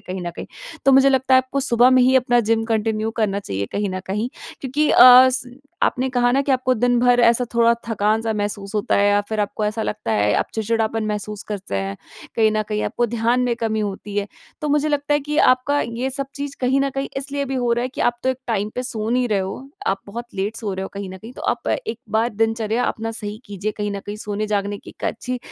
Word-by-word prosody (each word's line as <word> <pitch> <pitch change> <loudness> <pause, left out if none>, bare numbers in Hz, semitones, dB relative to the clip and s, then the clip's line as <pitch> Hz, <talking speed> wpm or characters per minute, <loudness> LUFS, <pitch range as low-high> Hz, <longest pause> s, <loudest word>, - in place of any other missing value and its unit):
कहीं 185 +1 -6
न - - -2
कहीं। 170 - -8 0.4
तो 275 - +5
मुझे 270 +1 +6
लगता 265 -1 +3
है - - +8
आपको 260 +2 -1
सुबह 245 -1 +4
में 255 -1 +5
ही 255 +1 +4
अपना 245 -1 +3
जिम 225 0 +1
कंटिन्यू 220 -1 0
करना 215 -3 -1
चाहिए 100 - -4
कहीं 205 0 -1
न 185 0 -4
कहीं। 210 +5 -2 0.3
क्योंकि 290 +3 0
अ, 255 +1 +9
स 250 -1 -3 0.3
आपने 260 0 +1
कहा 245 -1 +2
ना 270 - +3
कि 280 - +1
आपको 255 0 +2
दिन 245 +1 +2
भर 245 0 +4
ऐसा 235 +1 +4
थोड़ा 235 0 +5 0.2
थकान-सा 220 +1 +1
महसूस 205 0 -4
होता 210 - +1
है 200 - +3
या 205 0 +3
फिर 220 -1 -1
आपको 210 +1 -2
ऐसा 215 +1 -1
लगता 115 - -3
है 105 -1 +2
आप - - +1
चिड़चिड़ापन 225 0 0
महसूस 210 0 -4
करते 195 - -5
हैं, 95 0 -3 0.4
कहीं 220 -1 +4
न 215 0 +1
कहीं 210 -1 -1
आपको 240 - 0
ध्यान 235 +2 +1
में 250 -1 +1
कमी 220 -2 -1
होती 205 0 -5
है। 205 -1 0 0.3
तो 300 - -2
मुझे 295 +1 +2
लगता 290 0 0
है 290 - +2
कि 295 +2 -4
आपका 265 +2 +3
ये 235 +3 -3
सब 275 0 -4
चीज़ 280 0 -5
कहीं 260 +2 +2
न 275 0 +1
कहीं 275 0 -2
इसलिए 280 +1 -3
भी 270 0 -4
हो 245 -2 +1
रहा 240 - 0
है 250 - -1
कि 260 - -8
आप 240 0 +1
तो 260 - 0
एक 260 - -4
टाइम 210 -2 -1
पे 250 - -2
सो 225 -4 -4
नहीं 250 0 +1
रहे 210 -2 +1
हो। 195 +8 -5 0.2
आप 195 0 0
बहुत 235 +4 -6
लेट 200 +4 -2
सो 210 -4 -3
रहे 190 - -4
हो 195 - -4
कहीं 200 -1 -5
न 190 - -9
कहीं 225 +6 -11
तो - - -10
आप 240 - -1
एक 225 +1 -2
बार 220 +2 +2
दिनचर्या 225 +1 0
अपना 225 0 -2
सही 210 -2 -6
कीजिए 205 +1 -4
कहीं 210 -1 -2
न 200 - -4
कहीं 205 +1 -5
सोने 210 0 -3
जागने 205 -1 -1
की - - -12
एक - - -10
अच्छी 250 +2 -3
225 Hz, 250 wpm, -21 LUFS, 210-255 Hz, 0.4 s, अ